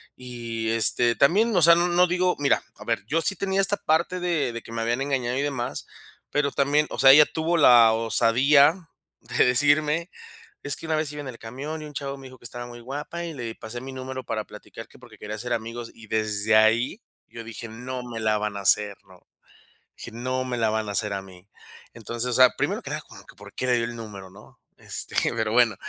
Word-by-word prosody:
y 115 -3 -5
este, 115 +1 +3
también, 210 +11 +3
o 180 - +4
sea, 170 +1 +8
no 175 +1 +2
no 180 +1 +4
digo, 180 +1 +1
mira, 140 -2 +2
a - - -13
ver, - - -1
yo 160 +6 0
sí 200 - +1
tenía 195 0 -1
esta 195 +1 +4
parte 170 +3 0
de 155 -9 -1
de 115 - -6
que - - -13
me 115 0 -3
habían 120 +3 -1
engañado 130 -3 -1
y 140 - 0
demás, 135 -4 -3 0.4
pero 145 -1 0
también, 145 +2 +1
o - - -7
sea, 135 0 +8
ella 150 +2 +8
tuvo 165 +3 -1
la 120 -7 +7
osadía 140 +9 +3 0.3
de - - +1
decirme: 150 +6 +2 0.5
"Es 145 - -2
que - - -9
una 160 -1 0
vez 155 -1 -1
iba 150 - -7
en 135 - -8
el 120 - -9
camión, 140 +7 -7
y - - -7
un 145 - -12
chavo 140 -1 -4
me 135 - -12
dijo 130 -1 -15
'que - - -22
estaba 120 +1 -7
muy 120 0 -11
guapa, 145 +7 -6
y 170 - -5
le 120 -4 -6
pasé 115 +2 -8
mi 135 +1 -8
número 130 -1 -6
para 110 -1 -3
platicar', - - -12
que - - -19
porque - - -16
quería 105 +1 -6
hacer 120 +2 -5
amigos", 115 +1 -4
y 115 - -14
desde 110 0 +1
ahí 115 - +3 0.3
yo 115 - -9
dije: 115 0 -8
"No 125 +3 -7
me 120 -2 -7
la 110 -1 +1
van 105 -1 -3
a - - -4
hacer", 100 +1 +2
¿no?, 90 -1 -18 0.8
dije: 115 - -9
"No 130 +2 -3
me 125 -1 -3
la 110 -2 +1
van 110 -1 -2
a - - -4
hacer 105 0 -1
a 95 - -3
mí". 95 0 -16 0.5
Entonces, 115 +2 -4
o 125 - -2
sea, 130 0 +6
primero - - -1
que - - -7
nada - - -3
como - - -14
que, - - -17
¿por - - -14
qué - - -3
le 125 - +3
dio 115 - 0
el 120 0 -6
número?, 105 -4 -9
¿no?, 100 +3 -18 0.2
este, - - -5 0.2
pero 110 -1 -1
bueno, 120 -4 +4
125 Hz, 235 wpm, -24 LUFS, 115-145 Hz, 0.8 s, sea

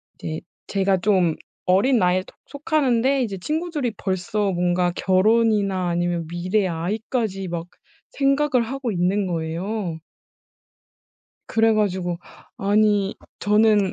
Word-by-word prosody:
이제 160 0 -5 0.3
제가 195 -1 +1
좀 180 -4 +2 0.3
어린 215 +7 +3
나이에 180 0 +2
톡 - - -18
속하는데 275 -3 +1
이제 200 -4 -4
친구들이 305 - -2
벌써 195 +2 -1
뭔가 175 0 +1
결혼이나 200 -2 +2
아니면 175 -1 -1
미래의 185 +4 0
아이까지 195 +3 -2
막 170 0 -4 0.4
생각을 275 -2 +2
하고 260 -1 -3
있는 185 +2 +1
거에요. 170 +2 -3 1.5
그래 225 0 +3
가지고 185 -5 0 0.4
아니 205 0 +2 0.2
저는 210 -2 +3
195 Hz, 255 characters per minute, -23 LUFS, 180-225 Hz, 1.5 s, 어린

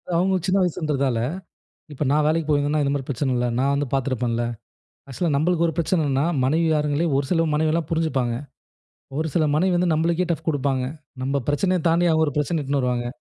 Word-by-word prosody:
அவங்க 185 +3 +2
சின்ன 190 0 +2
வயசுன்றதால 145 -7 0 0.8
இப்ப 145 - -3
நான் 150 0 +3
வேலைக்கு 155 0 +1
போயிருந்தேன்னா, 145 +1 +2
இந்த 140 - 0
மாரி 140 -2 -3
பிரச்சன 135 0 -1
இல்ல. 120 0 0
நான் 140 +1 +2
வந்து 140 -1 -1
பார்த்துருப்பேன்ல. 125 -3 0 0.6
ஆக்சுவலா 150 +6 -2
நம்மளுக்கு 170 +3 +2
ஒரு 165 - -3
பிரச்சனன்னா, 155 -5 +1 0.2
மனைவி 160 +5 +2
மாறுங்களே 150 +1 +1
ஒரு 140 - 0
சில 165 -2 +2
மனைவலாம் 155 +1 +1
புரிஞ்சிப்பாங்க. 150 -7 0 0.9
ஒரு 160 - 0
சில 160 - +3
மனைவி 180 +4 +2
வந்து 175 -1 +1
நம்மளுக்கே 170 +3 +1
டஃப் 165 - -4
குடுப்பாங்க. 135 -3 0 0.4
நம்ம 140 +1 0
பிரச்சனைய 180 +5 +1
தாண்டி 170 +2 +3
அவங்க 160 0 +3
ஒரு 145 - -4
பிரச்சன 150 +1 0
இழுதுட்டு 140 0 -1
வருவாங்க. 125 -1 -1
150 Hz, 175 wpm, -23 LUFS, 140-165 Hz, 0.9 s, நான்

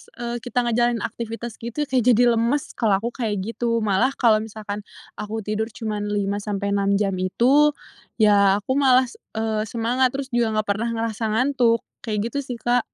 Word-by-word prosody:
eee, 240 0 -4
kita 245 +1 -1
ngejalanin 240 -1 +1
aktivitas 230 0 -6
gitu 235 +6 -3
kayak 265 -3 +1 0.2
jadi 240 +2 +4
lemes, 245 +5 0
kalau 215 -4 +1
aku 235 - -2
kayak 215 -6 -2
gitu. 230 +1 -1
Malah 215 +6 +1
kalau 225 -3 +4
misalkan 215 -1 -6 0.4
aku 220 +1 -4
tidur 215 +2 -2
cuman 210 -2 -4
5 205 -1 -1
sampai 200 -1 -3
6 200 0 +2
jam 200 -1 +1
itu, 270 +11 +3 0.4
ya 205 -2 +4
aku 260 +6 0
malas, 255 -2 +3 0.2
eee, 220 -1 -1
semangat 245 +3 0
terus 275 0 -5
juga 235 -2 +1
nggak 215 0 0
pernah 215 +4 -1
ngerasa 225 -1 -2
ngantuk, 245 -2 +2 0.2
kayak 215 0 -3
gitu 280 - -2
sih, 245 - -4
Kak. 245 +1 +3
225 Hz, 175 wpm, -23 LUFS, 210-245 Hz, 0.4 s, jadi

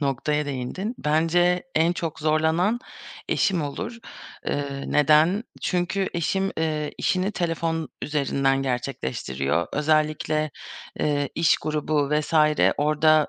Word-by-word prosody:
noktaya 145 +2 0
değindin. 145 - -4
Bence 170 +4 +2
en 165 +2 +3
çok 165 -3 -4
zorlanan 160 +8 +2 0.5
eşim 190 -6 +1
olur. 220 - -5 0.5
Eee, 140 -1 -2
neden? 155 - +4 0.2
Çünkü 185 +2 0
eşim, 190 +3 0
eee, 155 -2 -1
işini 190 +3 0
telefon 165 -2 -1
üzerinden 135 -2 +1
gerçekleştiriyor. 85 - -2
Özellikle, 155 0 +1 0.5
eee, 145 -2 +1
iş 165 0 +4
grubu 150 -1 -1
vs. 150 +2 0 0.4
orada, 155 +1 +3
155 Hz, 105 wpm, -24 LUFS, 145-170 Hz, 0.5 s, neden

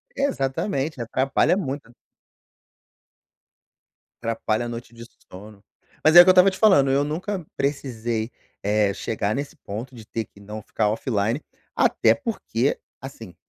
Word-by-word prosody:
Exatamente, 140 - -1
atrapalha 135 - +1
muito. 135 - -5 2.3
Atrapalha 115 0 -1
a - - -4
noite 120 0 -8
de 115 0 -11 0.3
sono, 100 +2 -12 0.4
mas 155 +2 +5
é - - +13
o - - +13
eu - - +5
estava 185 +1 +7
te 190 - -8
falando, 185 -11 +5
eu 140 +1 +3
nunca 175 +4 -3
precisei, 120 -5 -2 0.3
eh, 105 -1 +2
chegar 110 -2 -2
nesse 145 +4 -4
ponto 120 +4 -7
de 110 -2 -11
ter 115 0 -4
que 100 - -21
não 105 +2 -8
ficar 105 +1 -1
offline, 115 +3 -1 0.3
até - - +4
porque, 285 - -2 0.2
assim - - -10
125 Hz, 140 wpm, -24 LUFS, 110-155 Hz, 2.3 s, é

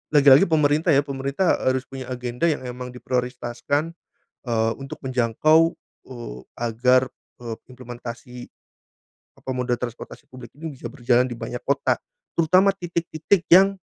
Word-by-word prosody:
lagi-lagi 140 +2 +8
pemerintah 155 +1 +3
ya, 140 - +4
pemerintah 140 +6 0
harus 130 0 +1
punya 130 -1 -8
agenda 125 +2 -5
yang 145 -4 -2
memang 125 0 -6
diprioritaskan, 125 +5 -2 0.5
eee, 115 -1 +1
untuk 135 0 -8
menjangkau, 145 +7 +3 0.4
eee, 120 - -8 0.2
agar, 125 +3 +3 0.3
eee, 115 -2 -5 0.2
implementasi, 125 -1 -9 1.0
apa, - - -7
moda 125 -1 0
transportasi 120 -2 -7
publik 125 -2 -12
ini 160 -3 -6
bisa 120 -2 -8
berjalan 125 -2 +2
di 120 - -5
banyak 120 +1 -5
kota, 140 0 +1 0.4
terutama 185 +4 +4
titik-titik 170 0 -1
yang 195 +2 +7
130 Hz, 130 wpm, -23 LUFS, 120-155 Hz, 1.0 s, lagi-lagi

